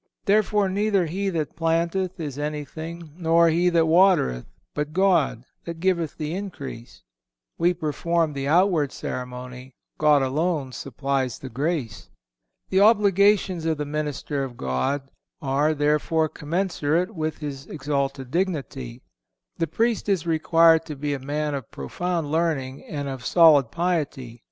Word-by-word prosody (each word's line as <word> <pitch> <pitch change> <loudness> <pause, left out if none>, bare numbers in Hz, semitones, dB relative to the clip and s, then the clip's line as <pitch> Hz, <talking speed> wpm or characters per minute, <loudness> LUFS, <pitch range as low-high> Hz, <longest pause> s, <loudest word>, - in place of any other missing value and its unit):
Therefore, 210 0 +3
neither 200 -1 +1
he 195 +5 -2
that 160 -5 -3
planteth 170 +3 0
is 145 -4 -5
anything, 155 +2 -5
nor 165 0 +4
he 175 +2 +3
that 165 -2 +3
watereth, 165 - +3 0.3
but 150 +1 -3
God 170 -10 +2 0.2
that 170 -1 -6
giveth 170 -3 0
the 155 0 -3
increase."(510) 145 - -7 0.6
We 175 +1 +3
perform 165 0 0
the 140 0 -3
outward 165 -3 +3
ceremony; 125 0 -7 0.2
God 150 -2 +4
alone 145 0 -1
supplies 135 -1 -2
the 130 - -8
grace. 135 -3 -3 0.6
The 190 - +3
obligations 200 -4 +4
of 160 -1 +1
the 150 - -3
minister 145 -1 -3
of 125 -3 -7
God 65 - -2 0.3
are, 145 +2 +1
therefore 150 +2 +1
commensurate 170 +3 -1
with 155 -3 -3
his 140 -3 -6
exalted 140 -3 -3
dignity. 140 -8 -3 0.6
The 165 - +1
Priest 225 +6 0
is 190 -5 +1
required 165 0 +4
to 150 - -5
be 145 +1 -2
a 140 - -3
man 150 +2 -2
of 135 -5 -5
profound 165 - -3
learning 150 -5 -1
and 145 -2 -4
of 135 -2 -6
solid 150 -8 +6
piety. 145 -9 -2
155 Hz, 135 wpm, -24 LUFS, 140-175 Hz, 0.6 s, solid